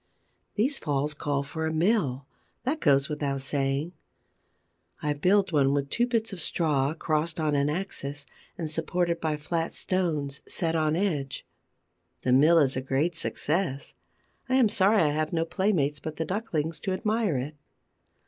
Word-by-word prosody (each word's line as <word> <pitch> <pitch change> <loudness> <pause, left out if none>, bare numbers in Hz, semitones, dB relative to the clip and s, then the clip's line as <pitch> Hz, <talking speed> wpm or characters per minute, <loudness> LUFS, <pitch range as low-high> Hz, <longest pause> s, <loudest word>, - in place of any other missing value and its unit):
These 260 +7 +1
falls 145 0 -1
call 145 -1 -1
for 160 +3 -3
a - - -1
mill: 160 - +1 0.4
that 280 +6 -1
goes 140 - +3
without 140 -2 -2
saying. 135 +4 -1 1.1
I 150 -1 0
build 185 +6 +2
one 140 -3 +3
with 140 -1 -2
two 240 +1 +2
bits 225 -3 -1
of 180 - -2
straw, 150 -3 +1
crossed 155 0 -1
on 155 -2 +1
an 140 0 +2
axis, 145 -4 -3 0.3
and 165 - -3
supported 170 +2 -1
by 155 -2 0
flat 165 +2 -2
stones 155 -7 -1
set 165 -2 -1
on 155 -1 +2
edge. 155 -8 -1 0.8
The 125 - +2
mill 155 +6 +6
is 140 -4 +3
a 130 - -1
great 135 +6 0
success. 160 -2 -1 0.6
I 255 - +2
am 250 -5 +5
sorry 205 -1 +4
I 150 - +3
have 155 +2 -1
no 165 -1 +1
playmates 165 -6 0
but 155 -1 -6
the 160 - -2
ducklings 165 -5 -2
to 190 - -2
admire 210 - 0
it. 140 +5 -4
155 Hz, 160 wpm, -27 LUFS, 140-180 Hz, 1.1 s, mill